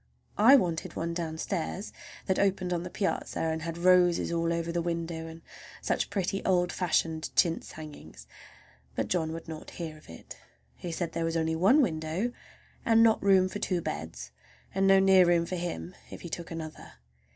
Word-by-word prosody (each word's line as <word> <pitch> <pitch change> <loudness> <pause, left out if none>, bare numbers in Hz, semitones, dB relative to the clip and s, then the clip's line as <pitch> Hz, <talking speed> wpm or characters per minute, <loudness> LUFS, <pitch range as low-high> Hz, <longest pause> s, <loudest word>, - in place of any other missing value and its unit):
I 240 +6 +8
wanted 175 -10 0
one 170 +1 -2
downstairs 170 +3 -3 0.3
that 190 - 0
opened 185 -2 +1
on 170 - -1
the 180 - -6
piazza 195 +2 -2
and 160 0 -1
had 165 +1 -5
roses 180 -1 +4
all 170 0 0
over 170 0 -1
the 170 0 -1
window, 165 -1 -3
and 165 0 -11 0.4
such - - -1
pretty 195 0 -2
old 180 -2 +2
fashioned 165 -3 0
chintz 165 -1 +1
hangings! 150 - -11 0.7
but - - -2
John 160 -3 0
would 165 +1 -7
not 160 -1 -8
hear 160 -3 -5
of - - -20
it. 80 - -11 0.4
He 175 - -6
said 165 0 -3
there 165 0 -2
was 165 0 0
only 160 0 0
one 220 - +5
window 160 +4 -1 0.5
and 225 0 +5
not 225 -1 +4
room 190 -2 +5
for 205 - -6
two 180 -3 0
beds, 75 - -6 0.4
and 195 0 +2
no 195 0 +7
near 190 -1 +6
room 170 -1 +3
for 185 - -6
him 90 - -4 0.2
if - - -9
he 170 - -7
took 170 +1 -6
another. 160 -2 -8
170 Hz, 185 wpm, -29 LUFS, 160-185 Hz, 0.7 s, I